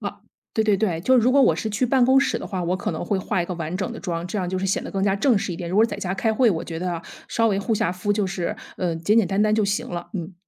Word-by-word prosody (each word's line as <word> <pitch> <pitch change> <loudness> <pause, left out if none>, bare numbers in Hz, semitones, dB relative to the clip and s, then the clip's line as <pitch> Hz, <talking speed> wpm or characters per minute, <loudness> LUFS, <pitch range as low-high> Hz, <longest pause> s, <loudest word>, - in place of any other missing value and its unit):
啊， - - -6 0.3
对 220 - +1
对 210 -2 +3
对， 185 -5 0
就 260 +9 +4
如 245 +1 +4
果 280 - +5
我 - - +4
是 220 - -3
去 215 +5 0
办 255 0 +3
公 265 +2 +5
室 280 - 0
的 - - -6
话， 185 -3 -3
我 180 +2 0
可 195 - -3
能 160 -1 -4
会 195 +2 0
画 185 -1 -1
一 - - -5
个 180 - -4
完 165 0 -4
整 190 +4 -3
的 - - -8
妆， 170 -2 -3
这 195 +3 -3
样 180 -2 -2
就 185 - -2
是 190 - -1
显 190 - 0
得 - - -7
更 195 - -2
加 195 -1 +2
正 240 +1 +3
式 190 - -3
一 165 - -5
点。 170 -1 -5
如 185 - -1
果 220 - +6
在 230 - -3
家 190 -2 -3
开 220 +3 0
会， 235 +1 +4
我 165 -4 -2
觉 165 -1 -5
得 175 -1 -3 0.3
稍 230 -1 +2
微 195 - +1
护 220 +3 0
下 180 -3 0
肤， 195 +3 -1
就 205 -1 0
是， 185 -2 -3 0.2
呃， 175 -3 -1
简 185 +7 +1
简 220 - +3
单 195 +2 0
单 215 0 +3
就 215 -1 +2
行 200 0 -1
了， 175 0 -6
嗯。 180 -1 -5
195 Hz, 360 characters per minute, -23 LUFS, 180-220 Hz, 0.3 s, 果